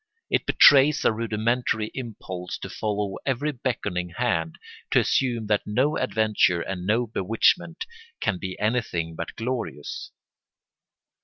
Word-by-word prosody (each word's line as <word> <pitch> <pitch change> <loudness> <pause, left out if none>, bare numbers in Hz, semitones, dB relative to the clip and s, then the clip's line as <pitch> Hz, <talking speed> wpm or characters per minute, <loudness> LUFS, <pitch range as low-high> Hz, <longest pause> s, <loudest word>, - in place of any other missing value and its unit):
It - - +1
betrays 140 +1 +6
a - - +5
rudimentary 110 0 -1
impulse 95 -7 -6
to - - -6
follow 105 -2 -2
every 140 +3 0
beckoning 105 -9 -3
hand, 85 -10 0 0.3
to - - +4
assume 120 -4 +1
that 105 -1 0
no 130 +9 +1
adventure 110 - +2
and 90 -1 -5
no 115 +4 +2
bewitchment 115 - +1 0.3
can 90 - -1
be 95 -1 -5
anything 105 -8 -1
but - - -6
glorious. 115 - -4
110 Hz, 125 wpm, -25 LUFS, 95-125 Hz, 0.3 s, betrays